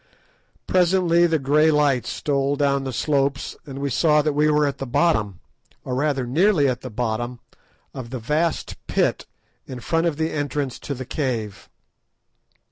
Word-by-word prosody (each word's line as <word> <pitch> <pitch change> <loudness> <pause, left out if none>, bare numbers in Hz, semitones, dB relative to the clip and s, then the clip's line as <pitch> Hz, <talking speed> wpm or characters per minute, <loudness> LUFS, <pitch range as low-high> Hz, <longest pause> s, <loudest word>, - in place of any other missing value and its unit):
Presently 175 -1 +3
the 165 -1 +1
grey 150 +3 +3
light 145 -5 +2
stole 140 -1 -1
down 140 -1 +1
the 130 - -3
slopes, 140 +2 -1
and 135 -1 -7
we 140 0 -2
saw 150 +3 +3
that 150 -1 0
we 150 +1 +2
were 150 0 +3
at 140 - -3
the 135 - -4
bottom, 110 - +1 0.4
or 130 - -4
rather, 135 -1 0
nearly 155 +3 +3
at 125 -1 -1
the 130 - -7
bottom, 120 +1 -3 0.5
of 130 -3 -7
the 130 - -4
vast 150 +7 -1
pit - - 0 0.4
in 130 -2 -7
front 165 +7 0
of 155 -4 -2
the 160 0 -1
entrance 145 -3 -3
to 140 - -5
the 130 +1 -7
cave. 115 -8 -4
140 Hz, 165 wpm, -22 LUFS, 130-155 Hz, 0.5 s, Presently